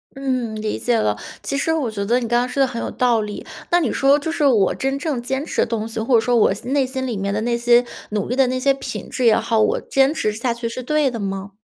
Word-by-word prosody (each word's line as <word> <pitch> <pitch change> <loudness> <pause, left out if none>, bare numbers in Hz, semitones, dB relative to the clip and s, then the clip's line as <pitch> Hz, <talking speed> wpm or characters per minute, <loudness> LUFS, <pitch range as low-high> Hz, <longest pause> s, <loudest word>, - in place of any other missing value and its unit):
嗯， 255 -5 -2
理 215 0 -3
解 240 -1 +1
了。 105 - 0 0.3
其 275 - -2
实 320 +3 +1
我 285 -8 -1
觉 200 -2 -3
得 240 +4 +2
你 240 - -3
刚 240 +1 +2
刚 245 - 0
说 265 +2 -1
得 - - +6
很 235 -3 -5
有 - - -3
道 240 -3 +1
理。 210 -1 -6 0.2
那 350 - +4
你 295 -9 0
说， 275 +1 +4
就 295 +2 -3
是 320 -3 0
我 220 -9 +4
真 270 +1 -2
正 280 -4 -2
坚 265 +4 -3
持 - - -7
的 - - +3
东 225 -1 -2
西， 225 - -4
或 235 +3 +2
者 225 - +5
说 245 +1 +1
我 220 -4 +4
心 225 +6 -7
内 280 -2 +3
心 260 0 -3
里 240 -5 -3
面 200 +1 -2
的 210 - -1
那 235 +1 0
些 240 +1 +4 0.3
努 210 -2 -1
力 250 - -2
的 265 -1 +3
那 255 +1 -1
些 275 +1 +3
品 270 - -7
质 255 - -2
也 225 - +6
好， 225 -2 0
我 215 - +2
坚 270 +2 +2
持 215 -9 -1
下 235 +3 -2
去 235 0 -4
是 255 - -6
对 295 +1 +1
的 230 - -5
吗？ 195 0 -4
245 Hz, 315 characters per minute, -21 LUFS, 220-270 Hz, 0.3 s, 得